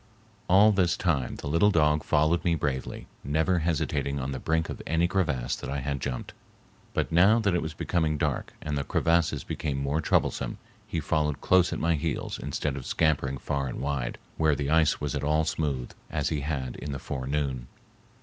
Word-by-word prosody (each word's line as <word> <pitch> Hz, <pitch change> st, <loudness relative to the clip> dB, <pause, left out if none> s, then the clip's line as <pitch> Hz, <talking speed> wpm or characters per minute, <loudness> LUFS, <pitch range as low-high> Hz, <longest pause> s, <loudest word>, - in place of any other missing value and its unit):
All 100 Hz, +4 st, +7 dB
this 90 Hz, -4 st, +2 dB
time 75 Hz, -8 st, 0 dB
the -, -, -7 dB
little 85 Hz, +8 st, +4 dB
dog 75 Hz, -4 st, +3 dB
followed 80 Hz, +3 st, +2 dB
me 85 Hz, -2 st, +2 dB
bravely, 70 Hz, -4 st, -3 dB, 0.2 s
never 80 Hz, +5 st, +1 dB
hesitating 75 Hz, -4 st, -1 dB
on 65 Hz, +1 st, -3 dB
the 65 Hz, -, -4 dB
brink 80 Hz, +3 st, 0 dB
of -, -, -6 dB
any 80 Hz, +2 st, +2 dB
crevasse 75 Hz, -10 st, 0 dB
that -, -, -7 dB
I 70 Hz, -, -2 dB
had 70 Hz, -1 st, -3 dB
jumped, 65 Hz, -3 st, -4 dB, 0.6 s
but -, -, 0 dB
now 95 Hz, +7 st, +6 dB
that 105 Hz, -5 st, +1 dB
it 85 Hz, -, +1 dB
was 80 Hz, -1 st, -5 dB
becoming 80 Hz, -3 st, 0 dB
dark -, -, -1 dB
and 75 Hz, -1 st, -2 dB
the 70 Hz, -, -1 dB
crevasses 85 Hz, +2 st, +1 dB
became 70 Hz, -3 st, -3 dB
more 70 Hz, +3 st, 0 dB
troublesome, 60 Hz, -4 st, 0 dB, 0.3 s
he 85 Hz, -, -2 dB
followed 75 Hz, -1 st, 0 dB
close 95 Hz, -1 st, +4 dB
at -, -, -2 dB
my 85 Hz, +1 st, +1 dB
heels 80 Hz, 0 st, -2 dB
instead 75 Hz, -3 st, -2 dB
of 65 Hz, -, -7 dB
scampering 70 Hz, -4 st, +1 dB
far 70 Hz, +1 st, -2 dB
and 60 Hz, -, -5 dB
wide, 70 Hz, -3 st, -2 dB, 0.2 s
where 80 Hz, -2 st, +3 dB
the 70 Hz, +1 st, -2 dB
ice 80 Hz, -2 st, +3 dB
was 75 Hz, -2 st, -2 dB
at 70 Hz, -1 st, -2 dB
all 75 Hz, +2 st, +2 dB
smooth, 70 Hz, -6 st, -2 dB, 0.2 s
as -, -, -1 dB
he 75 Hz, -3 st, -1 dB
had 70 Hz, -4 st, -3 dB
in 75 Hz, -1 st, -5 dB
the -, -, -3 dB
forenoon. 65 Hz, -1 st, -3 dB
75 Hz, 195 wpm, -27 LUFS, 70-80 Hz, 0.6 s, All